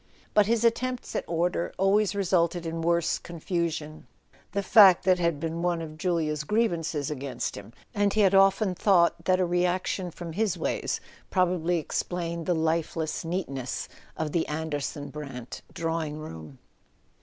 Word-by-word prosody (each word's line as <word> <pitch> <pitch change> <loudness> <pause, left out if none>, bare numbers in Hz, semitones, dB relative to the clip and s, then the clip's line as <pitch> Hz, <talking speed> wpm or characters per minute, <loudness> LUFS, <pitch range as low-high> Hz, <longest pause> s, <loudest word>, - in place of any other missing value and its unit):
But 210 -1 +5
his 230 0 +2
attempts 250 +2 0
at - - 0
order 170 +1 0
always 200 +1 +2
resulted 175 -3 +1
in 165 0 -3
worse 170 0 +1
confusion; 165 -2 -4 0.4
the 200 +2 -1
fact 195 -3 +7
had 175 -5 +2
been 165 +1 -3
one 175 -1 +1
of 155 -2 -7
Julia's 155 -3 -1
grievances 165 -7 0
against 135 -3 -4
him, 100 +2 -10 0.2
and 205 -1 +2
he 215 - +2
had 195 -1 +4
often 195 0 +4
thought 180 -2 +3
that 185 0 +3
a 185 - +3
reaction 180 +1 0
from 170 -1 -8
his 210 -1 0
ways - - -1 0.3
probably 180 -2 +1
explained 170 +1 -3
the 175 - +2
lifeless 160 0 -1
neatness 140 -8 -3 0.3
of 155 -1 -2
the 165 0 0
Anderson 150 -2 -3
Brant 135 -5 -7
drawing 165 -2 -2
room. 80 - -9
170 Hz, 145 wpm, -27 LUFS, 155-185 Hz, 0.4 s, fact